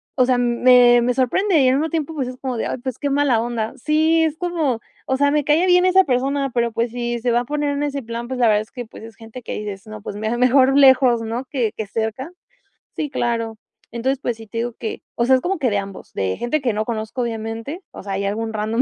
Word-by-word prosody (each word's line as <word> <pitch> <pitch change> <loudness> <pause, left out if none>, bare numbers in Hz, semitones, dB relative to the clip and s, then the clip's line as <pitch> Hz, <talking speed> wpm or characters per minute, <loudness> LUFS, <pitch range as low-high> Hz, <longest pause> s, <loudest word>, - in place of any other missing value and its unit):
o 255 -2 +4
sea, 250 -1 +2
me 245 0 +5
me 245 +1 +1
sorprende 320 +9 +2
y 260 - +4
al 260 - +3
mismo 310 +3 0
tiempo, 320 0 -2
pues, 270 -5 -2
es 255 - -6
como 255 -3 -4
de: - - -2
"Ay, - - -3
pues, 255 -1 -5
qué 285 - -1
mala 275 -4 +2
onda". 230 -1 -3
Sí, 315 +4 +2
es 315 -1 0
como, 320 -10 -1 0.2
o 265 - 0
sea, 285 0 +3
me 295 -1 +1
cae 315 +5 +3
bien 360 0 +5
esa 375 +1 +5
persona, 275 +1 0
pero, 235 -2 0
pues, 230 0 -1
si 240 0 -2
se 240 +1 0
va 240 - +3
a - - -7
poner 295 +1 -1
en 285 0 -2
ese 280 -2 -3
plan, 235 +1 -5
pues, 260 0 -4
la 235 - +5
verdad 210 -1 +3
es 215 - -12
que, 245 -2 -6
pues, 220 - -13
es 225 -2 -11
gente 225 +3 -11
que - - -6
dices: 205 -1 -7
"No, 215 -1 -9
pues 205 - -7
mira, 220 +3 -2
mejor 260 +2 +4
lejos, 260 -4 +5
¿no?, 230 +3 -4
que 245 -6 -1
que 215 -2 -4
cerca". 225 - -4 0.6
Sí, 300 -2 -2
claro, 230 -3 -2 0.3
entonces, 260 +3 -1
pues 240 - -2
sí, 225 -1 -12
te 230 - -8
digo 240 0 -2
que, 225 - -5
o 235 - +1
sea, 260 +1 +5
es 255 - 0
como 375 -2 -2
que 255 -4 +1
de 205 - 0
ambos, 195 -1 -7
de 95 -1 -1
gente 275 +6 -1
que 240 -5 0
no 215 +1 -1
conozco, 220 +2 -4
obviamente, 225 +6 -4
o - - -10
sea, 195 -1 -4
ahí 200 +1 -2
algún 220 +2 -2
random 220 +3 0
245 Hz, 265 wpm, -21 LUFS, 225-280 Hz, 0.6 s, me